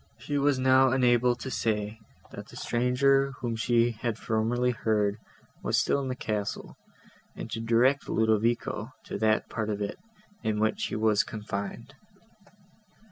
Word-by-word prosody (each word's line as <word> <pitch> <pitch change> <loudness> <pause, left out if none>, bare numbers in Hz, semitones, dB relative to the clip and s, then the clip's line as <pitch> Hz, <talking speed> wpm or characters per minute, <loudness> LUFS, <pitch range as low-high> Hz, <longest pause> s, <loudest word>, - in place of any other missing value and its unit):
She 140 +5 -2
was 140 -1 +2
now 130 0 +4
enabled 125 -1 +3
to 130 - -5
say, 105 -1 -1 0.3
that - - -9
the - - -14
stranger, 135 +3 +2
whom 120 -2 -2
she 120 +1 +2
had 115 0 -3
formerly 115 +3 0
heard, 105 -3 0 0.4
was - - 0
still 140 - +2
in 135 - -4
the 130 - -2
castle, 105 -5 -4 0.6
and 115 - -7
to 115 - -3
direct 120 +5 +2
Ludovico 110 +1 0
to - - -6
that 110 0 +2
part 110 -2 -3
of 105 -1 -2
it, 100 -1 -4 0.4
in 110 -2 -1
which 110 0 0
he - - -4
was 110 -1 +3
confined. 105 +4 -6
115 Hz, 150 wpm, -28 LUFS, 110-125 Hz, 0.6 s, now